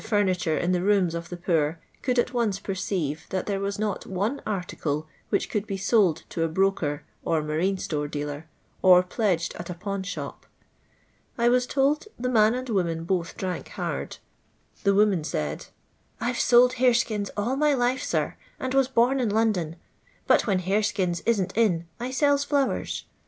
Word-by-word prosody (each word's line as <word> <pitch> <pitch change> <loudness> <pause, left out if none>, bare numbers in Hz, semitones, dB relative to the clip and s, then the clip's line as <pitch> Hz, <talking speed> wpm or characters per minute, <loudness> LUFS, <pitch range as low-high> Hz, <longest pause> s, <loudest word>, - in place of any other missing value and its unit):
furniture 185 -6 +1
in 175 - 0
the 180 -1 +1
rooms 190 -3 +2
of 170 0 -5
the 175 - -6
poor 165 -2 0 0.2
could 250 -1 0
at 240 - +1
once 230 -5 +1
perceive 185 -6 -3
that 185 - -2
there 200 -2 -1
was 200 0 -2
not 210 -2 -2
one 205 +9 -2
article 170 -6 -2 0.2
which - - +1
could 210 0 -2
be 195 - -3
suld 195 -5 +2
to 165 - -4
a 165 - +2
broker 165 -4 0 0.2
or 160 -2 +1
marine 165 +6 0
store 150 -5 -2
dealer, 145 +1 -5 0.3
or 180 -1 +7
pledged 180 -3 0
at 170 - -7
a 180 - -4
pawn 200 +2 -4
shop. 190 - -6 0.9
I 235 0 +3
was 250 0 +2
told 285 +6 +1
the 250 +1 -2
man 220 -1 +4
and 255 +1 -4
woman 170 -7 0
both 175 0 -2
drank 185 -4 -3
hard. - - -4 0.6
The 200 -1 +3
woman 200 -5 +3
said: 75 - -3 0.2
— - - -41
" - - -40
I 240 - 0
\e - - -5
sold 250 +1 +4
horeskins 235 -5 +2
all 230 +6 0
my 295 0 +3
life, 250 +1 +1
sir, - - -1 0.2
and 260 0 -3
was 270 -1 +4
bom 260 +1 +3
in 240 -4 +1
London; 205 -7 +1 0.5
but - - +3
when 190 -3 +2
hareskins 190 -2 0
isn't 195 -5 +1
in, 190 -7 +2
I 245 +2 -3
sells 285 +1 +2
flowers. 285 -2 0
200 Hz, 180 wpm, -26 LUFS, 175-235 Hz, 0.9 s, or